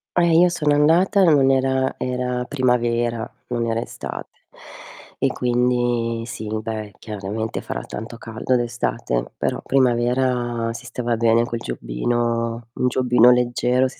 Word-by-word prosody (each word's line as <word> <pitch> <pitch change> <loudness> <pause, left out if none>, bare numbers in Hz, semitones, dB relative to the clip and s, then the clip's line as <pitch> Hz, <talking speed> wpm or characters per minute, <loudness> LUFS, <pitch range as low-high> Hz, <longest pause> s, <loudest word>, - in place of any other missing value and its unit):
Eh, 170 -2 +4
io 180 - +6
sono 150 -4 +1
andata, 175 +7 +4
non 140 -5 +5
era 130 0 +1
era 125 -1 -2
primavera, 120 -3 0 0.2
non 120 -1 -1
era 115 0 0
estate. - - -7 0.9
E - - +4
quindi 120 -2 0
sì, 110 -3 -7
beh, 110 -2 -5
chiaramente 105 +1 -4
farà - - -5
tanto 115 +2 -8
caldo 115 +2 -2
d'estate, 120 - -2
però - - -2
primavera 120 -2 +1
si - - -9
stava 120 -1 -2
bene 115 0 +3
col 120 -1 -4
giubbino 115 - -2
un 125 - 0
giubbino 125 -1 +4
leggero 125 +1 +2
si 130 - -12
120 Hz, 135 wpm, -21 LUFS, 115-130 Hz, 0.9 s, io